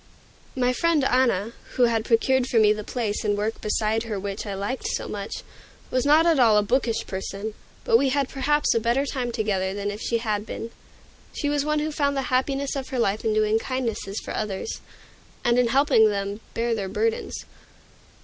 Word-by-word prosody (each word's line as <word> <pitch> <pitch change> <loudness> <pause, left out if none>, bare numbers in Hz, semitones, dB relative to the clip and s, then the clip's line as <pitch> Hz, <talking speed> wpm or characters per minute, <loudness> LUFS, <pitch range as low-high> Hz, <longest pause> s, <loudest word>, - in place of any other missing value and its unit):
My 250 -1 +2
friend 330 +1 +2
Anna, 240 -5 +2 0.2
who 250 - +3
had 230 -2 +2
procured 255 +2 +2
for 240 - 0
me 215 -1 +6
the 210 0 -6
place 220 -2 -2
and 205 -1 +1
work 215 +2 -2
beside 215 +1 0
her 215 -3 -3
which 200 +2 -5
I 200 - -3
liked 205 +7 -3
so - - -2
much, 200 0 -5 0.5
was 255 +2 +1
not 310 +3 +6
at 330 -4 +4
all 225 -4 +6
a 210 - +4
bookish 235 +1 0
person, 195 +3 -5 0.3
but 225 - +5
we 275 0 +2
had 275 0 +1
perhaps 295 +3 +1
a 230 - +2
better 240 +5 +1
time 255 -4 -2
together 195 -4 -1
than 205 0 -2
if 205 +2 -7
she 235 - 0
had 215 -3 -1
been. 225 +1 -6 0.6
She 290 - -2
was 290 -1 +1
one 305 0 +1
who 305 +1 -1
found 280 -2 0
the 260 -1 -2
happiness 275 +2 0
of 270 -1 -4
her 260 - -3
life 215 -3 +1
in 220 - +1
doing 215 +1 +3
kindnesses 230 -6 -3
for - - -5
others, 210 - -3 0.6
and 240 0 +4
in 250 - +3
helping 235 -3 +4
them 200 0 -3 0.2
bear 230 0 0
their 200 -4 -3
burdens. 220 +3 -2
230 Hz, 200 wpm, -25 LUFS, 210-265 Hz, 0.6 s, me